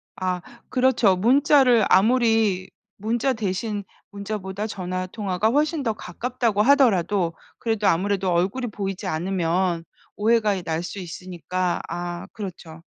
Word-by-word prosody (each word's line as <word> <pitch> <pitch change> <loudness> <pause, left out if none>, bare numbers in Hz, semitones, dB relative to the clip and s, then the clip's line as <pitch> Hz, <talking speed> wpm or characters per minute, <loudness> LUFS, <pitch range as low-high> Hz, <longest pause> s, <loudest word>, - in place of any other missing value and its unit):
아 185 -1 -2 0.3
그렇죠. 250 -7 +3
문자를 250 +1 +4
아무리 220 -3 +3 0.3
문자 235 +5 0
대신 205 -1 -3 0.3
문자보다 200 0 -4
전화 185 -2 -4
통화가 200 +1 -1
훨씬 300 +3 +1
더 225 -4 0
가깝다고 235 -2 -1
하더라도 205 - +3 0.3
그래도 220 -3 0
아무래도 190 +1 +1
얼굴이 195 +9 0
보이지 195 -2 -4
않으면 175 0 0 0.3
오해가 215 -1 +2
이 185 - -5
날 165 0 -2
수 195 +3 -6
있으니까. 180 0 -3
아 175 0 -5
그렇죠. 170 -5 -8
200 Hz, 295 characters per minute, -23 LUFS, 180-225 Hz, 0.3 s, 문자를